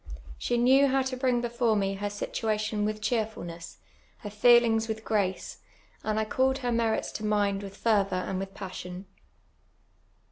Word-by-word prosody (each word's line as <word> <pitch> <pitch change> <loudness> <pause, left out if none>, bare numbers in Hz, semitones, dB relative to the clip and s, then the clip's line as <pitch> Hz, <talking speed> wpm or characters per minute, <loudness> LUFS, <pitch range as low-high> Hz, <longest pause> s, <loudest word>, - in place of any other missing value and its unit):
She 240 - 0
knew 265 +4 +5
how 270 0 +2
to 260 0 -3
brini; 250 -2 +1
before 235 -1 +1
me 195 -1 0
her 205 +1 -3
situation 215 0 -2
with 215 0 -3
cheerfulness, 210 -8 -3 0.4
her 205 - -7
feelings 225 0 +4
with 220 0 -5
^"ace, 200 -4 -1 0.5
and 215 0 0
I 220 - 0
called 265 +4 +1
her 245 - +1
merits 230 -1 0
to 215 - -6
mind 205 -2 +1
w 200 - -6
ith - - -17
fervour 205 -4 +2
and 185 +1 -2
with 195 0 -6
j)assion. 185 -1 -7
215 Hz, 165 wpm, -28 LUFS, 200-240 Hz, 0.5 s, knew